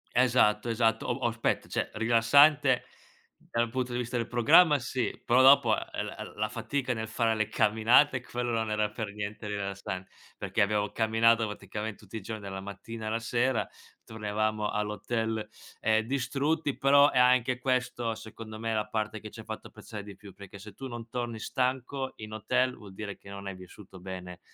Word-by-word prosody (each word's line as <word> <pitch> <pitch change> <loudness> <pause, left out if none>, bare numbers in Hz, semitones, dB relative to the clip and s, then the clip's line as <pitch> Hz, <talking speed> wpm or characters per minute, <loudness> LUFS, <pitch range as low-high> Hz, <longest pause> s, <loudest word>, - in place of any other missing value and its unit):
Esatto, 120 -3 +3
esatto. 115 -1 +1
O - - +1
o - - +5
aspetta, 115 0 -1
cioè - - -2
rilassante 130 +5 +5 0.7
dal 115 0 +1
punto 125 +1 -2
di - - -1
vista 125 0 -3
del 115 -1 -1
programma 140 +6 +5
sì, 125 0 -3
però 125 +2 +5
dopo, 135 -4 +7
ehm, - - -4
l - - -8
la 110 +1 -1
fatica 125 +2 -2
nel 110 -1 -4
fare 115 -1 +1
le 110 -1 -1
camminate 120 +5 +4
quello 120 -1 -3
non 110 -1 -1
era 105 0 +1
per 110 -1 -5
niente 105 +1 -6
rilassan 100 -2 -4 0.3
perché - - -1
abbiamo 105 0 +1
camminato 115 0 +3
praticamente 105 0 -6
tutti 105 +1 -13
i - - -6
giorni 110 +1 -6
dalla 95 -1 -6
mattina 105 +3 -7
alla 110 +1 -1
sera, 120 +1 0 0.4
tornavamo 110 -1 -1
all'hotel, 105 +1 -2 0.4
ehm, 110 0 +3
distrutti, 140 +3 -1
però 140 +1 +6
è - - -1
anche 125 0 +4
questo 125 -3 -1
secondo 110 0 -9
me 115 0 -2
la 105 -1 0
parte 110 0 -2
che 105 0 -9
ce 110 - -10
fatto 110 0 -7
apprezzare 110 -1 -9
di 100 -1 -10
più, 100 -1 -13
perché 100 +1 -12
se 105 0 -11
tu 135 +5 -7
non 120 -2 -8
torni 120 -2 -4
stanco 130 +3 -2
in 110 0 -8
hotel 125 +4 0
vuol 100 -3 -12
dire 100 0 -6
che 100 - -15
non 100 0 -7
hai 95 - -5
vissuto 95 +1 -13
bene, 90 -1 -8
110 Hz, 180 wpm, -29 LUFS, 105-125 Hz, 0.7 s, dopo